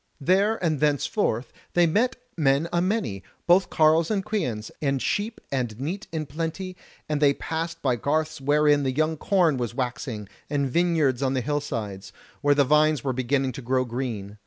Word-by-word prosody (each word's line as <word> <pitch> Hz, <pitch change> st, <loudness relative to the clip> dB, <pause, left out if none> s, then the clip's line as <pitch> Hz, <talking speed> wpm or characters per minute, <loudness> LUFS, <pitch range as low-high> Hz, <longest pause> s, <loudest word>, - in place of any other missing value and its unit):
There 195 Hz, +8 st, +3 dB
and 155 Hz, -4 st, +1 dB
thenceforth 145 Hz, -, 0 dB, 0.2 s
they 175 Hz, 0 st, +5 dB
met 220 Hz, +10 st, +2 dB, 0.2 s
men 145 Hz, 0 st, +2 dB
a 170 Hz, -, +2 dB
many, 185 Hz, -, -1 dB, 0.2 s
both 180 Hz, +2 st, +4 dB
carles 160 Hz, +1 st, +4 dB
and 195 Hz, -3 st, -1 dB
queans, 125 Hz, -, -2 dB
and 135 Hz, -2 st, +1 dB
sheep 210 Hz, -, -2 dB
and 120 Hz, -5 st, -2 dB
neat 180 Hz, +10 st, -4 dB
in 160 Hz, -2 st, -3 dB
plenty, 165 Hz, +6 st, -4 dB, 0.3 s
and 150 Hz, -1 st, -1 dB
they 140 Hz, -1 st, +5 dB
passed 165 Hz, +1 st, -4 dB
by 125 Hz, -3 st, +2 dB
garths 155 Hz, +3 st, -1 dB
wherein 145 Hz, +1 st, +3 dB
the 135 Hz, -2 st, 0 dB
young 155 Hz, +1 st, +2 dB
corn 170 Hz, -3 st, +2 dB
was 120 Hz, -2 st, -3 dB
waxing, 120 Hz, -4 st, -3 dB, 0.2 s
and 140 Hz, -2 st, 0 dB
vineyards 155 Hz, -4 st, +2 dB
on 135 Hz, -1 st, +1 dB
the 130 Hz, -, +1 dB
hillsides, 115 Hz, -8 st, -4 dB, 0.3 s
where 145 Hz, 0 st, +4 dB
the 140 Hz, -, +5 dB
vines 150 Hz, -1 st, +3 dB
were 130 Hz, -, 0 dB
beginning 130 Hz, +1 st, 0 dB
to 130 Hz, -, -8 dB
grow 130 Hz, +1 st, +1 dB
green. 115 Hz, -5 st, -5 dB
145 Hz, 175 wpm, -25 LUFS, 130-165 Hz, 0.3 s, they